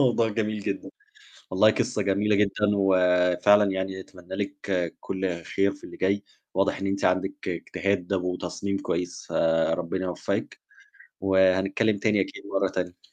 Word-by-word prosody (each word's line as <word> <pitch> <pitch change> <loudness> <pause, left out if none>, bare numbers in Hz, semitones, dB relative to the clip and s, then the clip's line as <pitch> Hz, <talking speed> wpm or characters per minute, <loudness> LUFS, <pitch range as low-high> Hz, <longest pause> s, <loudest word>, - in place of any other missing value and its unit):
موضوع 120 -4 +3
جميل 105 -1 -2
جدًا، 100 -1 -4 0.6
والله 95 +4 +5
قصّة 105 - -1
جميلة 100 +2 +2
جدًا، 100 -1 +2 0.2
وفعلًا 95 +1 +4
يعني 95 0 -3
أتمنّى 95 0 -11
لِك 100 -1 -3 0.4
كل 95 -3 -3
خير 100 +4 +1
في 100 - -14
اللي - - -10
جاي 100 +2 +1 0.3
واضح - - +1
إن 100 - -2
أنتِ 100 0 -1
عندِك 95 +1 0
اجتهاد 100 -2 -2
و 90 -1 0
وتصميم 100 +2 -3
كويس. 90 -2 -3
فربنا 80 +3 +1
يوفّقِك 90 - -3 0.6
وهنتكلّم 95 +3 +3
تاني 105 0 +2
أكيد 95 - -4
مرّة - - 0
تانية. 90 -1 -5
95 Hz, 140 wpm, -26 LUFS, 90-100 Hz, 0.6 s, والله